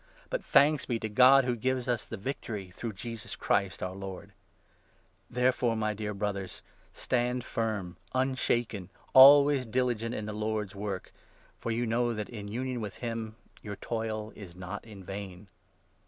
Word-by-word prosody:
But - - -1
thanks 145 +1 +4
be 120 - 0
to 110 - -2
God, 130 +4 +7
who 125 -1 +1
gives 130 +2 -1
us 120 -3 -1
the - - -5
57 95 - -15
victory, 105 -8 -4
through 110 +5 -5
Jesus 115 +3 -6
Christ, 100 -1 0
our 90 0 -3
Lord. 95 -1 -8 1.0
Therefore, 125 -1 +2
58 - - -2
my 110 -1 0
dear 105 0 -4
Brothers, 100 -2 -3 0.3
stand 125 0 -1
firm, 105 -7 -2 0.2
unshaken, 120 -7 0 0.2
always 140 -1 +8
diligent 120 -1 0
in 105 - -4
the 105 - -4
Lord's 105 -1 -2
work, 100 -2 -5 0.5
for - - -4
you 115 +2 0
know 120 +1 +1
that, 105 -1 -4
in 105 -4 -7
union 125 +3 -3
with 105 -3 -5
him, 115 -2 -4 0.3
your 105 -1 -6
toil 110 0 -3
is 90 -5 -10
not 95 +2 -6
in 105 -4 -11
vain. 95 0 -7
110 Hz, 165 wpm, -30 LUFS, 100-125 Hz, 1.0 s, always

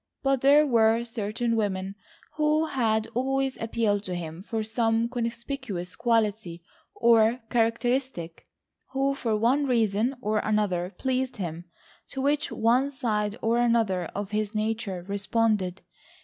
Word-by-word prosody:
But 270 -2 +2
there 290 +3 +6
were 230 -3 +3
certain 230 +1 -2
women 195 -3 -1 0.4
who 305 +1 +2
had 220 -7 0
always 270 +1 0
appealed 220 -3 0
to 180 - -3
him 165 0 -6
for 220 +2 -3
some 225 +1 +1
conspicuous 235 -5 -4
quality, 215 -7 0 0.3
or 230 +1 +4
characteristic, 235 -6 -1 0.5
who 270 +1 +1
for 230 -5 -1
one 260 +6 +2
reason 230 +1 +1
or 215 -3 0
another 200 -5 0
pleased 260 -1 -1
him, 170 -3 -5 0.4
to 270 - -6
which 285 +2 +1
one 245 +5 +2
side 215 -6 -2
or 230 +1 +2
another 225 -7 +2
of 205 0 -4
his 215 0 -2
nature 215 -4 -2
responded. 200 -2 0
225 Hz, 130 wpm, -26 LUFS, 205-250 Hz, 0.5 s, there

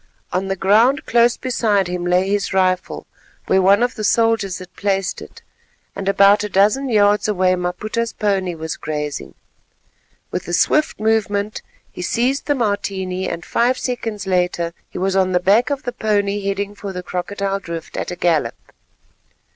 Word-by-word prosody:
On 185 +2 -1
the 195 - -1
ground 220 - +3
close 235 0 +3
beside 220 -7 +1
him 175 0 -3
lay 180 +2 +2
his 200 -1 -1
rifle, 185 -1 0 0.4
where 190 - +3
one 200 +4 +5
of 245 - 0
the 215 - -6
soldiers 225 -3 +2
had 185 -1 -12
placed 195 -2 -1
it, - - -13 0.5
and 195 0 -2
about 200 +1 +5
a 210 - -3
dozen 210 +8 +2
yards 205 -2 +3
away 185 -3 +2
Maputa's 210 +6 -2
pony 190 -4 -1
was 160 -1 -5
grazing. 150 -2 -5 1.0
With - - -4
a 175 - -4
swift 305 - +2
movement, 215 -1 0 0.3
he - - -8
seized 245 +9 0
the 290 - +2
Martini 195 -5 -2
and 170 0 -5
five 245 +2 +1
seconds 225 -5 -4
later 180 -2 0 0.2
he - - -9
was 190 +1 0
on 185 -1 +2
the 180 - +3
back 205 +8 +3
of 285 0 -2
the 245 - -4
pony, 205 -1 0
heading 200 +1 -2
for 200 -1 -7
the 180 -1 -6
Crocodile 195 +2 -3
Drift 170 -3 -7
at - - -3
a 180 - -4
gallop. 170 -4 +1
200 Hz, 170 wpm, -19 LUFS, 185-215 Hz, 1.0 s, one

